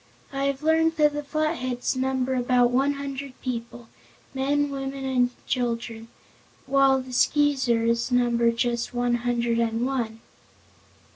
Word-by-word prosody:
I 275 0 -1
have 275 +1 -2
learned 320 +1 +3
that 300 -1 +3
the 295 - -3
Flatheads 285 -5 -2
number 260 0 0
about 245 -1 +3
one 270 +3 +2
hundred 280 -1 -6
people 235 -1 -5 0.5
men, 285 +2 0
women 270 0 -4
and 250 -2 +2 0.2
children 230 -2 -2 0.6
while 270 0 +4
the 255 -1 -8
Skeezers 245 -4 +2
number 240 -1 +3
just 235 +1 -2
one 245 0 +1
hundred 235 -1 0
and 230 +1 0
one." 235 -4 -3
255 Hz, 130 wpm, -25 LUFS, 240-275 Hz, 0.6 s, while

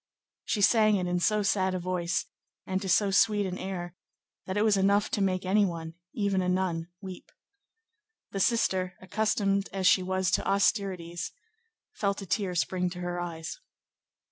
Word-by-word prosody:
She 210 - -1
sang 215 0 +5
it 185 -2 0
in 180 0 0
so 210 +4 +2
sad 190 -2 +1
a - - -1
voice, 180 -1 -1 0.4
and 190 0 -2
to 195 - -4
so 200 +2 +3
sweet 205 +1 +3
an 185 0 -4
air, 180 -2 -5 0.5
that 190 +1 -2
it 210 - +3
was 215 -2 +4
enough 200 +1 +2
to 205 - 0
make 185 -1 0
any 205 +3 +4
one, 165 -3 -3 0.2
even 200 -3 +1
a 180 - 0
nun, 180 -3 0
weep. 190 -2 -9 1.0
The 195 - -3
sister, 185 -4 +1
accustomed 200 0 0
as 190 -1 -2
she 185 - +6
was 185 -1 0
to - - +1
austerities, 190 -4 0 0.6
felt 200 -1 -1
a - - -7
tear 185 0 -1
spring 180 +1 0
to 180 0 -8
her 175 0 -3
eyes. 170 - -5
190 Hz, 170 wpm, -28 LUFS, 180-200 Hz, 1.0 s, she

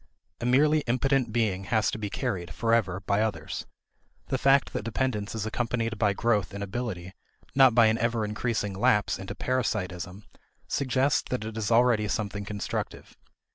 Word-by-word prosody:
A 120 - -2
merely 150 +5 +4
impotent 130 0 +1
being 105 -5 0
has 110 -2 +1
to - - -5
be 105 -1 -3
carried, 85 -4 -3
forever, 115 -5 +1
by 100 +1 +1
others. 110 -2 -3 0.6
The - - 0
fact 135 0 +4
that - - -2
dependence 115 -2 -2
is 110 -2 -2
accompanied 115 -1 -2
by 105 -2 +3
growth 105 -3 0
in 100 - -4
ability, 95 -4 -4 0.4
not 130 -4 +6
by 120 -2 +7
an 110 +1 +2
ever 115 -1 0
increasing 105 -1 -2
lapse 105 -1 +2
into 95 - -6
parasitism, 100 -6 -2 0.4
suggests 135 +1 +1
that 125 -4 -2
it 110 0 -6
is 110 -2 -2
already 115 -2 +4
something 105 -1 -3
constructive. 100 -1 -5
110 Hz, 160 wpm, -27 LUFS, 100-120 Hz, 0.6 s, by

